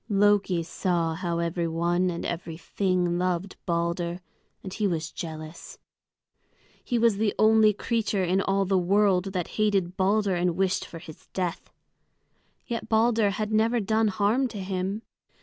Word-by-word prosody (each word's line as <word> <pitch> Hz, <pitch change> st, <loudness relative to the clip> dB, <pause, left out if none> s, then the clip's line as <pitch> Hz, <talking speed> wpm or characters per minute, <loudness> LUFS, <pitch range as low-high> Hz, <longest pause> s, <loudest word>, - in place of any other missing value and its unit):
Loki 200 Hz, -4 st, +3 dB
saw 170 Hz, -1 st, -1 dB
how 170 Hz, +1 st, -2 dB
every 170 Hz, 0 st, -1 dB
one 175 Hz, +2 st, +1 dB
and 170 Hz, -1 st, -4 dB
every 170 Hz, -1 st, -4 dB
thing 180 Hz, 0 st, 0 dB
loved 180 Hz, +1 st, -1 dB
Balder, 170 Hz, 0 st, -1 dB, 0.4 s
and 190 Hz, -, -7 dB
he 210 Hz, 0 st, 0 dB
was 160 Hz, -3 st, -2 dB
jealous. 155 Hz, 0 st, -8 dB, 1.1 s
He 245 Hz, -, -1 dB
was 230 Hz, -3 st, +3 dB
the 210 Hz, -1 st, 0 dB
only 220 Hz, 0 st, +5 dB
creature 210 Hz, -2 st, -1 dB
in 185 Hz, +2 st, +1 dB
all 195 Hz, 0 st, +1 dB
the 190 Hz, 0 st, +2 dB
world 190 Hz, 0 st, +3 dB
that 185 Hz, -3 st, -3 dB
hated 195 Hz, -4 st, +1 dB
Balder 200 Hz, +1 st, +2 dB
and 175 Hz, -1 st, 0 dB
wished 190 Hz, -1 st, +1 dB
for 165 Hz, -, -9 dB
his 160 Hz, -2 st, -13 dB
death. 180 Hz, -1 st, -3 dB, 0.9 s
Yet 230 Hz, -2 st, -4 dB
Balder 220 Hz, -1 st, +3 dB
had 210 Hz, +2 st, -3 dB
never 225 Hz, +2 st, +3 dB
done 220 Hz, +1 st, +1 dB
harm 210 Hz, +6 st, +1 dB
to 225 Hz, -4 st, -8 dB
him. 190 Hz, +3 st, -3 dB
190 Hz, 150 wpm, -26 LUFS, 175-210 Hz, 1.1 s, only